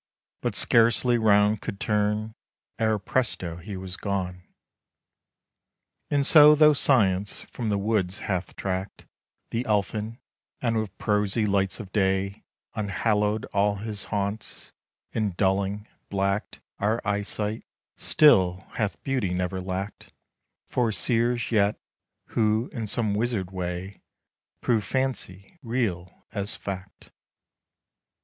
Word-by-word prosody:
but -, -, -1 dB
scarcely 120 Hz, +1 st, +4 dB
'round 105 Hz, -1 st, +4 dB
could 100 Hz, -, -5 dB
turn 105 Hz, +1 st, 0 dB, 0.5 s
Ere, 110 Hz, -1 st, +2 dB
presto! 95 Hz, -6 st, -1 dB
he 95 Hz, +3 st, -7 dB
was 95 Hz, -1 st, -6 dB
gone. 95 Hz, -3 st, -3 dB, 1.7 s
And 140 Hz, -1 st, +2 dB
so 150 Hz, 0 st, +8 dB
though 150 Hz, 0 st, +6 dB
Science 105 Hz, -8 st, +3 dB
from 115 Hz, -3 st, -5 dB
the 100 Hz, -, +1 dB
woods 100 Hz, -2 st, -1 dB
hath 95 Hz, -2 st, -3 dB
tracked 95 Hz, 0 st, -4 dB, 0.5 s
The 115 Hz, +2 st, -1 dB
Elfin; 105 Hz, +2 st, -1 dB, 0.4 s
and 115 Hz, -2 st, 0 dB
with 110 Hz, -2 st, -5 dB
prosy 105 Hz, +1 st, +1 dB
lights 100 Hz, 0 st, 0 dB
of 100 Hz, -4 st, -8 dB
day 95 Hz, -1 st, 0 dB, 0.3 s
Unhallowed 105 Hz, +1 st, 0 dB
all 100 Hz, 0 st, +2 dB
his 105 Hz, 0 st, -4 dB
haunts; 100 Hz, +1 st, -4 dB, 0.4 s
and, 105 Hz, -5 st, -1 dB
dulling, 100 Hz, +2 st, 0 dB, 0.2 s
blacked 100 Hz, +1 st, -1 dB, 0.2 s
Our 110 Hz, +3 st, +1 dB
eyesight, 105 Hz, +1 st, -2 dB, 0.3 s
still 95 Hz, -11 st, +4 dB
hath 105 Hz, -2 st, -2 dB
Beauty 125 Hz, -10 st, -1 dB
never 90 Hz, +1 st, -2 dB
lacked 95 Hz, +2 st, -5 dB, 0.6 s
For 120 Hz, -3 st, +1 dB
seers 120 Hz, +4 st, +1 dB
yet; 105 Hz, -2 st, +2 dB, 0.5 s
who, 110 Hz, +2 st, +1 dB
in 115 Hz, -4 st, -4 dB
some 110 Hz, -1 st, 0 dB
wizard 105 Hz, -4 st, -1 dB
way, 90 Hz, +1 st, -5 dB, 0.6 s
Prove 115 Hz, -3 st, +1 dB
Fancy 130 Hz, -, -3 dB
real 115 Hz, -8 st, -3 dB
as 100 Hz, -1 st, -3 dB
Fact. 95 Hz, -1 st, -8 dB
105 Hz, 115 wpm, -26 LUFS, 95-115 Hz, 1.7 s, so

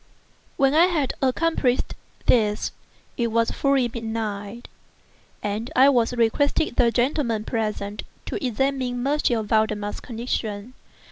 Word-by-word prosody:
When 270 Hz, 0 st, +3 dB
I 325 Hz, +3 st, +6 dB
had 305 Hz, -8 st, 0 dB
accomplished 265 Hz, -1 st, +1 dB, 0.3 s
this, 210 Hz, -3 st, +2 dB, 0.5 s
it 235 Hz, -, +1 dB
was 230 Hz, 0 st, +1 dB
fully 275 Hz, -3 st, +2 dB
midnight, 220 Hz, -1 st, -5 dB, 0.8 s
and 210 Hz, +4 st, -2 dB
I 265 Hz, +2 st, +7 dB, 0.3 s
requested 285 Hz, +7 st, +1 dB
the 235 Hz, -, +4 dB
gentlemen 240 Hz, -2 st, 0 dB
present 210 Hz, -2 st, -3 dB, 0.2 s
to -, -, -4 dB
examine 255 Hz, 0 st, -1 dB
M. 265 Hz, -6 st, +1 dB
Valdemar's 210 Hz, -1 st, 0 dB
condition. 225 Hz, -1 st, -4 dB
235 Hz, 110 wpm, -24 LUFS, 215-270 Hz, 0.8 s, I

